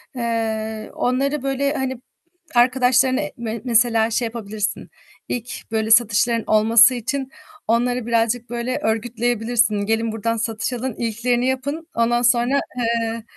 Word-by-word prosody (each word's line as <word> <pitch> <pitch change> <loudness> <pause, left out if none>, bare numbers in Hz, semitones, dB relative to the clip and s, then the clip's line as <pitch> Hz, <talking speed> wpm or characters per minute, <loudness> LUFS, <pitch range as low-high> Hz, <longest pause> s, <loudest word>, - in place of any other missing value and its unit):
eee, 220 -2 -3
onları, 275 +3 0
böyle, 275 +1 0
hani, 260 -3 -3 0.5
arkadaşlarınla 255 +2 +3 0.2
me 230 -1 -5
mesela 230 -1 +3
şey 235 - 0
yapabilirsin. 215 -2 -4 0.4
İlk, 240 -1 -6
böyle, 220 0 -1
satışların 230 0 +3
olması 225 +3 +6
için 265 +3 -3 0.4
onları 245 +1 +1
birazcık, 230 +1 0
böyle, 240 +1 -2
örgütleyebilirsin. 235 0 0
Gelin 225 +1 0
buradan 225 +1 -2
satış 225 +2 -2
alın, 245 -1 -4
ilklerini 240 +2 -1
yapın. 285 +5 -3
Ondan 240 +1 +2
sonra, 245 +3 +3 0.2
eee, 230 -1 -1
235 Hz, 120 wpm, -21 LUFS, 225-250 Hz, 0.5 s, olması